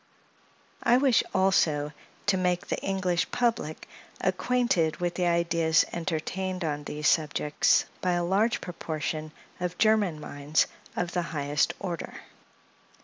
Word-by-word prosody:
I 240 - +4
wish, 260 -3 +4
also, 160 -6 +2 0.3
to 205 - +3
make 180 -1 0
the - - -2
English 185 -3 0
public 230 -11 -1 0.3
acquainted 220 -11 +1
with 175 -1 -1
the 180 -1 0
ideas 170 -2 +3
entertained 185 +2 -3
on 150 -2 -2
these 150 0 -2
subjects 150 -2 +2 0.2
by 180 -1 +1
a 175 0 +1
large 200 +6 +1
proportion 155 -3 -4 0.3
of 180 0 -3
German 210 -7 +3
minds 145 +1 0 0.3
of 175 -1 -2
the 175 - 0 0.2
highest 145 0 +1
order. 175 -5 -5
175 Hz, 125 wpm, -28 LUFS, 155-190 Hz, 0.3 s, I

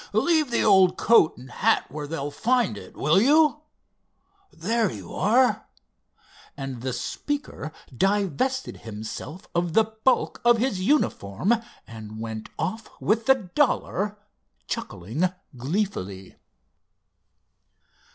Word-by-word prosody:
Leave 315 -5 +3
the 235 - +1
old 190 -3 +5
coat 225 -8 +4
and 125 0 -12
hat - - +2
where 150 +1 -5
they'll 145 -2 -4
find 240 - +1
it, - - -11
will 155 +7 +4
you? 300 +3 +4 0.9
There 220 +5 0
you 95 -5 -9
are," 245 +6 +2 0.9
and 135 -4 -5
the 130 +1 -2
speaker 155 - -4 0.2
divested 205 - 0
himself 110 - -8
of 170 -1 0
the 225 - +6
bulk 220 +4 0
of 240 0 +5
his 230 -5 0
uniform, 190 - +1 0.3
and 110 -1 -9
went 110 -1 -6
off 215 +7 -3
with 220 +4 +1
the 265 - +7 0.2
dollar, 210 -7 +1 0.5
chuckling 115 - -3 0.3
gleefully. 125 - -3
190 Hz, 110 wpm, -25 LUFS, -, 0.9 s, the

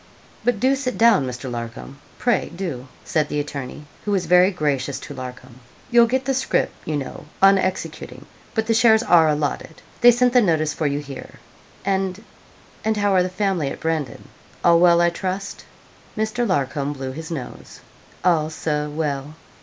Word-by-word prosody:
'But 245 -4 +1
do 265 +4 +3
sit 260 -2 -3
down, 225 - +5
Mr. 125 +1 -6
Larcom 120 +3 -7 0.2
pray 245 -1 +1
do,' 160 -9 -5 0.2
said 155 -1 0
the 150 - -1
attorney, 145 0 -6 0.2
who - - -4
was 195 -3 +1
very 180 +1 +5
gracious 145 -7 -1
to 145 - -8
Larcom. 125 -1 -9 0.3
'You'll 235 -1 +6
get 260 +2 -1
the 270 - +1
scrip, 265 +1 0
you 155 -1 -1
know, 140 +1 -6
on 195 0 +6
executing, 155 -8 -4 0.3
but 220 -1 +1
the 225 - +2
shares 225 0 +5
are 165 -3 +5
allotted. 150 +1 -3 0.2
They 245 - +9
sent 245 +1 +3
the 250 - +6
notice 155 -6 +1
for 155 - -1
you 140 0 -1
here. 140 -2 -8 0.5
And 190 +1 -1 0.6
and 220 0 0
how 205 -1 +2
are 185 - +5
the 180 - -1
family 185 -6 -1
at - - -7
Brandon 155 -7 -3 0.4
all 170 -1 +6
well, 170 -1 +5
I 170 0 +3
trust?' 190 +3 -5 0.5
Mr. 220 +3 -1
Larcom 140 -4 -1
blew 135 -2 -5
his 160 +4 -8
nose. 145 -7 -8 0.4
'All, 160 -4 +3
Sir, 150 -1 -2
well.' 145 -1 -3
165 Hz, 175 wpm, -22 LUFS, 145-205 Hz, 0.6 s, They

